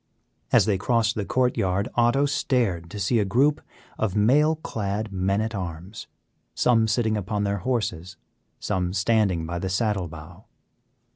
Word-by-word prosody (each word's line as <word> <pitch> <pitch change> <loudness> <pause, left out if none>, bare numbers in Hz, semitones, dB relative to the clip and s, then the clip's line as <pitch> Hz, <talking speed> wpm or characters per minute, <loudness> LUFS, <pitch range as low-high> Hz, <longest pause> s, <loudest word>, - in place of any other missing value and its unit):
As - - +5
they 100 -3 +1
crossed 115 +1 +1
the 105 -3 -3
court 125 +2 +1
yard 95 +1 0
Otto 120 +4 +3
stared 115 -11 0
to 105 - -8
see 110 +4 +1
a - - +3
group 135 +9 +2 0.4
of 110 -3 -1
mail 145 +9 +4
clad 105 -7 -4
men 95 +2 0
at 110 +1 -3
arms, 90 +2 -6 0.5
some 115 -2 +3
sitting 110 -1 +1
upon 105 0 -2
their 100 0 -1
horses, 95 -6 -3 0.4
some 90 -1 -2
standing 100 -4 +1
by 85 +2 -4
the 95 +2 -3
saddle 100 -2 0
bow. 80 -1 -12
105 Hz, 155 wpm, -24 LUFS, 95-115 Hz, 0.5 s, As